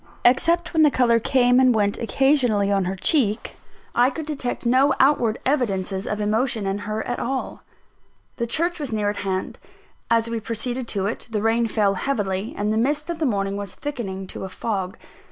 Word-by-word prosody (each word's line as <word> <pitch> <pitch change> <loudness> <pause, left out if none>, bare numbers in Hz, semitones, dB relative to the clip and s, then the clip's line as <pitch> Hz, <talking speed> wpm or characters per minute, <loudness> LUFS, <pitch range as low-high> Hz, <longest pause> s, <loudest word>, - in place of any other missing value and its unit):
Except 335 +9 +3
when 320 - +3
the 305 - +7
colour 240 -4 +3
came 245 +1 +3
and 255 -2 +5
went 205 -2 +1
occasionally 240 -5 +2
on 195 -2 +2
her 185 +2 -2
cheek, 220 - 0 0.4
I 245 +2 +4
could 315 +2 -6
detect 275 -6 -4
no 265 +4 +4
outward 250 -5 +3
evidences 195 -8 0
of 210 - -2
emotion 220 +1 0
in 195 +1 -1
her 215 +1 -4
at 245 - -3
all. 265 +1 -3 0.8
The 235 - -1
church 340 +8 -1
was 285 -5 -4
near 210 -2 0
at 205 - -8
hand. 190 -1 -3 0.5
As 230 0 +3
we 230 0 -2
proceeded 235 +3 -3
to 195 -3 -1
it, 215 +4 -4
the 215 -2 -2
rain 230 +1 +2
fell 210 -3 +2
heavily, 200 -2 -2
and 210 +1 0
the - - 0
mist 295 +7 0
of 335 - -5
the 310 - +1
morning 200 -3 -1
was 200 -2 -6
thickening 225 -10 -5
to 185 - -8
a 190 - -5
fog. 190 -1 -3
230 Hz, 190 wpm, -23 LUFS, 205-260 Hz, 0.8 s, the